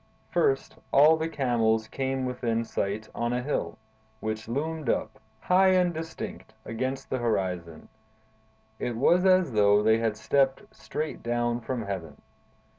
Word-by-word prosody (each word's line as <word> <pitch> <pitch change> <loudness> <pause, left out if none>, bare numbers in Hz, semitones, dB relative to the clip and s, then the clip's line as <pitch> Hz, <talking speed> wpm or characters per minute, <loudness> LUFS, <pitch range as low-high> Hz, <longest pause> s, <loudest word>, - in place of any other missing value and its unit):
First, 415 -2 +1
all 150 +4 +7
the 160 +1 -2
camels 115 -6 +1
came 130 0 -2
within 115 -2 -1
sight 105 +1 -3
on 120 +1 -1
a 125 0 -1
hill, 145 - -2 0.4
which 110 0 -4
loomed 150 +3 -3
up, 110 - -1 0.2
high 185 +1 +4
and 180 -1 +3
distinct, 160 0 -7
against 130 +4 -4
the 130 - 0
horizon; 90 -8 -2 0.9
it 120 -2 -3
was 175 +9 +4
as 185 -5 +4
though 105 -1 +4
they 110 +1 +4
had 110 -2 -1
stepped 135 - +1
straight 155 0 -5
down 120 0 0
from 120 0 -3
heaven. 95 -6 -6
120 Hz, 140 wpm, -27 LUFS, 110-150 Hz, 0.9 s, all